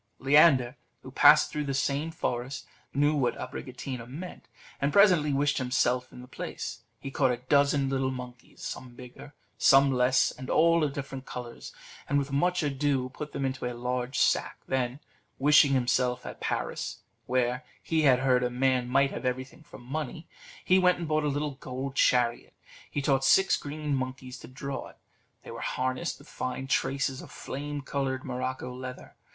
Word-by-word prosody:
Leander, 135 Hz, -3 st, +4 dB, 0.3 s
who -, -, -9 dB
passed -, -, +6 dB
through 150 Hz, -, -2 dB
the 135 Hz, -1 st, -2 dB
same 140 Hz, +3 st, 0 dB
forest, 130 Hz, -4 st, -3 dB, 0.3 s
knew 145 Hz, +2 st, +2 dB
what 125 Hz, -5 st, 0 dB
Abricotina 125 Hz, -2 st, -6 dB
meant, 165 Hz, -2 st, -8 dB, 0.3 s
and 140 Hz, +1 st, +1 dB
presently 180 Hz, -7 st, +5 dB
wished 145 Hz, +1 st, +1 dB
himself 125 Hz, 0 st, 0 dB
in 125 Hz, -, -11 dB
the -, -, -12 dB
place. 130 Hz, -, -6 dB, 0.2 s
He 135 Hz, -, -7 dB
caught 135 Hz, -1 st, +2 dB
a 125 Hz, -, 0 dB
dozen 140 Hz, +3 st, +2 dB
of 135 Hz, -, -1 dB
little 135 Hz, -1 st, 0 dB
monkeys, 125 Hz, -1 st, -9 dB
some 125 Hz, -2 st, -7 dB
bigger, 125 Hz, +3 st, -12 dB, 0.2 s
some 135 Hz, 0 st, +6 dB
less, 125 Hz, 0 st, +3 dB
and 130 Hz, 0 st, -9 dB
all 165 Hz, 0 st, +4 dB
of 145 Hz, -2 st, 0 dB
different 135 Hz, -1 st, -6 dB
colours, 120 Hz, -1 st, -8 dB, 0.4 s
and 145 Hz, -, +2 dB
with 140 Hz, 0 st, -1 dB
much 175 Hz, +5 st, +1 dB
ado 140 Hz, -2 st, 0 dB
put 150 Hz, +3 st, -7 dB
them 140 Hz, -, -2 dB
into 130 Hz, -2 st, -3 dB
a 120 Hz, -, -8 dB
large 125 Hz, +1 st, -2 dB
sack; -, -, +2 dB
then, 130 Hz, +1 st, -1 dB, 0.4 s
wishing 145 Hz, 0 st, +5 dB
himself 125 Hz, -1 st, +1 dB
at -, -, -8 dB
Paris, -, -, -3 dB, 0.2 s
where, 125 Hz, +1 st, 0 dB, 0.2 s
he 160 Hz, -1 st, +1 dB
had 130 Hz, -4 st, +4 dB
heard, 130 Hz, -2 st, +3 dB
a 125 Hz, -, +1 dB
man 125 Hz, 0 st, +1 dB
might 140 Hz, +2 st, +3 dB
have -, -, -6 dB
everything 130 Hz, +4 st, -3 dB
for 155 Hz, -, -13 dB
money, 150 Hz, +5 st, -5 dB, 0.4 s
he 185 Hz, +1 st, +5 dB
went 180 Hz, -1 st, +4 dB
and 170 Hz, -2 st, -5 dB
bought 155 Hz, 0 st, +1 dB
a -, -, +2 dB
little 145 Hz, +1 st, -1 dB
gold 135 Hz, 0 st, -6 dB
chariot. 125 Hz, -3 st, +2 dB, 0.3 s
He 145 Hz, -, -3 dB
taught 135 Hz, -1 st, +2 dB
six 190 Hz, +8 st, +5 dB
green 150 Hz, 0 st, -4 dB
monkeys 130 Hz, -1 st, -5 dB
to -, -, -11 dB
draw 135 Hz, +1 st, -6 dB
it; -, -, -17 dB, 0.5 s
they -, -, -9 dB
were -, -, -7 dB
harnessed 130 Hz, +6 st, -2 dB
with -, -, -17 dB
fine 130 Hz, +1 st, -4 dB
traces 135 Hz, 0 st, 0 dB
of -, -, -11 dB
flame 145 Hz, +1 st, -6 dB
coloured 135 Hz, -1 st, -2 dB
morocco 130 Hz, 0 st, -4 dB
leather. 125 Hz, 0 st, -8 dB
135 Hz, 180 wpm, -28 LUFS, 125-145 Hz, 0.5 s, passed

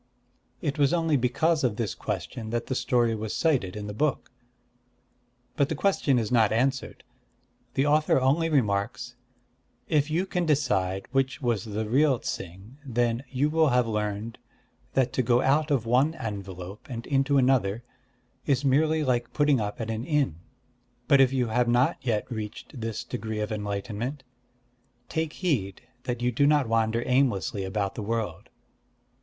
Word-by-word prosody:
_"' -, -, -39 dB, 0.6 s
It 145 Hz, +1 st, -2 dB
was 140 Hz, +1 st, +3 dB
only 165 Hz, -3 st, +1 dB
because 145 Hz, +5 st, +1 dB
of 120 Hz, -5 st, +1 dB
this 110 Hz, -2 st, -2 dB
question 105 Hz, -, -5 dB
that 120 Hz, +1 st, -2 dB
the -, -, -3 dB
story 120 Hz, -2 st, +1 dB
was 110 Hz, -1 st, -4 dB
cited 130 Hz, -, +1 dB
in 105 Hz, -1 st, -5 dB
the 105 Hz, -, -5 dB
book. 140 Hz, +3 st, -1 dB, 1.2 s
But 140 Hz, -1 st, +2 dB
the 160 Hz, -, -1 dB
question 145 Hz, -6 st, +2 dB
is 115 Hz, -2 st, -1 dB
not 115 Hz, -4 st, +4 dB
answered. 130 Hz, +4 st, -1 dB, 0.7 s
The 135 Hz, -, +2 dB
author 150 Hz, -1 st, +3 dB
only 145 Hz, +6 st, +2 dB
remarks: 120 Hz, -2 st, 0 dB, 0.7 s
'If 150 Hz, -1 st, +2 dB
you 170 Hz, +5 st, 0 dB
can 180 Hz, -3 st, -1 dB
decide 95 Hz, -11 st, +1 dB
which 135 Hz, +1 st, 0 dB
was 120 Hz, -7 st, -1 dB
the 110 Hz, 0 st, -3 dB
real 135 Hz, +3 st, +3 dB
Ts'ing, 95 Hz, +6 st, -7 dB
then 120 Hz, -2 st, 0 dB
you 140 Hz, +3 st, 0 dB
will 160 Hz, -1 st, +4 dB
have 125 Hz, -1 st, +3 dB
learned 105 Hz, 0 st, -3 dB, 0.6 s
that 130 Hz, -2 st, +2 dB
to -, -, +2 dB
go 120 Hz, 0 st, +3 dB
out 150 Hz, +3 st, +2 dB
of 135 Hz, -6 st, +1 dB
one 130 Hz, +7 st, +2 dB
envelope 100 Hz, -, -7 dB
and 120 Hz, -2 st, -5 dB
into 140 Hz, 0 st, +2 dB
another 120 Hz, -5 st, +2 dB, 0.6 s
is 140 Hz, -1 st, +1 dB
merely 155 Hz, +3 st, +3 dB
like 120 Hz, -3 st, 0 dB
putting 145 Hz, -5 st, +3 dB
up 105 Hz, +3 st, -4 dB
at 115 Hz, -1 st, -3 dB
an 110 Hz, +1 st, -3 dB
inn. 140 Hz, -, 0 dB, 0.7 s
But 140 Hz, -1 st, +6 dB
if 130 Hz, -1 st, +5 dB
you 125 Hz, -3 st, 0 dB
have 120 Hz, +2 st, +1 dB
not 125 Hz, +6 st, +3 dB
yet 115 Hz, -5 st, 0 dB
reached 110 Hz, +3 st, -6 dB
this 115 Hz, -2 st, -3 dB
degree 110 Hz, -3 st, -4 dB
of 105 Hz, +1 st, -2 dB
enlightenment, 105 Hz, +6 st, -4 dB, 0.9 s
take 160 Hz, -1 st, -2 dB
heed 115 Hz, -, -2 dB, 0.2 s
that 120 Hz, -1 st, -3 dB
you 125 Hz, -, +2 dB
do 140 Hz, +4 st, +3 dB
not 145 Hz, -4 st, +3 dB
wander 115 Hz, +1 st, +1 dB
aimlessly 110 Hz, -, +1 dB
about 95 Hz, +1 st, -2 dB
the -, -, -6 dB
world. 105 Hz, -5 st, -3 dB
125 Hz, 165 wpm, -27 LUFS, 110-140 Hz, 1.2 s, But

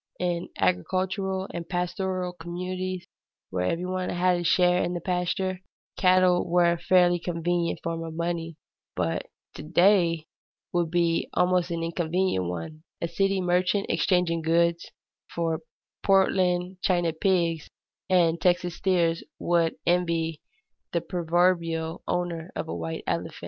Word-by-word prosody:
In 175 Hz, -1 st, -1 dB
agricultural 190 Hz, -, 0 dB
and 170 Hz, -1 st, -6 dB
pastoral 180 Hz, 0 st, -2 dB
communities 180 Hz, +1 st, -4 dB, 0.5 s
where 90 Hz, -1 st, -1 dB
every 170 Hz, -, -1 dB
one 185 Hz, 0 st, -2 dB
had 180 Hz, 0 st, +2 dB
a -, -, -3 dB
share 180 Hz, +1 st, +3 dB
in 175 Hz, -, -2 dB
the -, -, -2 dB
pasture, 180 Hz, +1 st, -1 dB, 0.3 s
cattle 185 Hz, -1 st, +4 dB
were 175 Hz, 0 st, +4 dB
a 170 Hz, -, -1 dB
fairly 175 Hz, -1 st, +4 dB
convenient 170 Hz, 0 st, -1 dB
form 165 Hz, 0 st, -3 dB
of 160 Hz, -1 st, -7 dB
money, 165 Hz, -1 st, -3 dB, 0.4 s
but 85 Hz, -2 st, -1 dB, 0.3 s
to -, -, -8 dB
day 170 Hz, 0 st, +3 dB, 0.5 s
would 175 Hz, -2 st, +1 dB
be 170 Hz, -1 st, +1 dB
a -, -, +4 dB
most 180 Hz, -1 st, +1 dB
inconvenient 170 Hz, -, -1 dB
one; 90 Hz, -, -6 dB, 0.2 s
a 170 Hz, -, -1 dB
city 195 Hz, +3 st, +1 dB
merchant 180 Hz, +2 st, +1 dB
exchanging 180 Hz, -3 st, +1 dB
goods 170 Hz, +1 st, +1 dB, 0.4 s
for 165 Hz, -1 st, -1 dB, 0.4 s
Poland 185 Hz, -2 st, +2 dB
China 175 Hz, -3 st, +1 dB
pigs 170 Hz, -2 st, 0 dB, 0.4 s
and 170 Hz, -3 st, +3 dB
Texas 175 Hz, -1 st, +1 dB
steers 170 Hz, -3 st, +1 dB
would 170 Hz, -1 st, +1 dB
envy 170 Hz, -2 st, +1 dB, 0.5 s
the 170 Hz, -, +1 dB
proverbial 170 Hz, -2 st, 0 dB
owner 175 Hz, -1 st, -2 dB
of -, -, -3 dB
a 85 Hz, -, -4 dB
white 80 Hz, -1 st, -4 dB
elephant. -, -, -2 dB
175 Hz, 135 wpm, -26 LUFS, 165-180 Hz, 0.5 s, cattle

